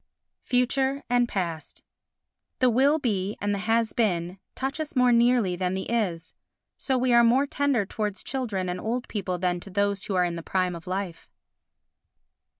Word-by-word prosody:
Future 265 Hz, +2 st, 0 dB
and 245 Hz, -1 st, +3 dB
Past 170 Hz, -5 st, -4 dB, 0.7 s
The 255 Hz, -1 st, +3 dB
Will 275 Hz, +6 st, +4 dB
be 205 Hz, -7 st, -1 dB
and 205 Hz, 0 st, -1 dB
the 200 Hz, -, -2 dB
Has 225 Hz, +2 st, +1 dB
been 180 Hz, -5 st, 0 dB, 0.2 s
touch 270 Hz, +4 st, -3 dB
us 310 Hz, -2 st, -5 dB
more 250 Hz, -1 st, +4 dB
nearly 235 Hz, -5 st, +3 dB
than 180 Hz, +1 st, -1 dB
the 190 Hz, -, -4 dB
Is. 185 Hz, -8 st, -1 dB, 0.4 s
So 265 Hz, -2 st, -1 dB
we 250 Hz, 0 st, +2 dB
are 235 Hz, 0 st, +7 dB
more 250 Hz, +4 st, +4 dB
tender 280 Hz, -6 st, 0 dB
towards 210 Hz, 0 st, -4 dB
children 220 Hz, -9 st, -3 dB
and 180 Hz, 0 st, -3 dB
old 240 Hz, +3 st, -2 dB
people 185 Hz, -4 st, -3 dB
than 175 Hz, 0 st, 0 dB
to 195 Hz, -, -11 dB
those 200 Hz, +1 st, 0 dB
who 195 Hz, -, -2 dB
are 180 Hz, -1 st, +3 dB
in 170 Hz, -1 st, -3 dB
the -, -, -5 dB
prime 185 Hz, +1 st, 0 dB
of 170 Hz, +2 st, -11 dB
life. 185 Hz, -2 st, -4 dB
210 Hz, 175 wpm, -26 LUFS, 185-250 Hz, 0.7 s, are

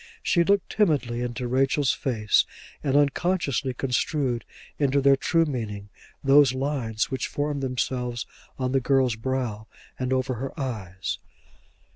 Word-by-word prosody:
She 170 Hz, -, +3 dB
looked 200 Hz, +2 st, +1 dB
timidly 140 Hz, -, +1 dB
into 125 Hz, +1 st, -3 dB
Rachel's 135 Hz, +2 st, +2 dB
face 110 Hz, -5 st, +2 dB, 0.4 s
and 140 Hz, -2 st, +1 dB
unconsciously 145 Hz, -2 st, +1 dB
construed 125 Hz, -1 st, 0 dB, 0.3 s
into 140 Hz, -1 st, +3 dB
their 140 Hz, 0 st, +5 dB
true 165 Hz, +4 st, +2 dB
meaning 105 Hz, -8 st, -4 dB, 0.3 s
those 135 Hz, -1 st, +6 dB
lines 130 Hz, -5 st, -1 dB
which 130 Hz, -, -1 dB
formed 145 Hz, -1 st, -2 dB
themselves 125 Hz, -2 st, -2 dB, 0.3 s
on 130 Hz, -1 st, -1 dB
the 135 Hz, 0 st, +2 dB
girl's 130 Hz, -2 st, +2 dB
brow 115 Hz, -3 st, -3 dB, 0.3 s
and 130 Hz, 0 st, -1 dB
over 130 Hz, 0 st, +1 dB
her 135 Hz, +6 st, -6 dB
eyes. 100 Hz, -8 st, -4 dB
130 Hz, 130 wpm, -25 LUFS, 120-140 Hz, 0.4 s, those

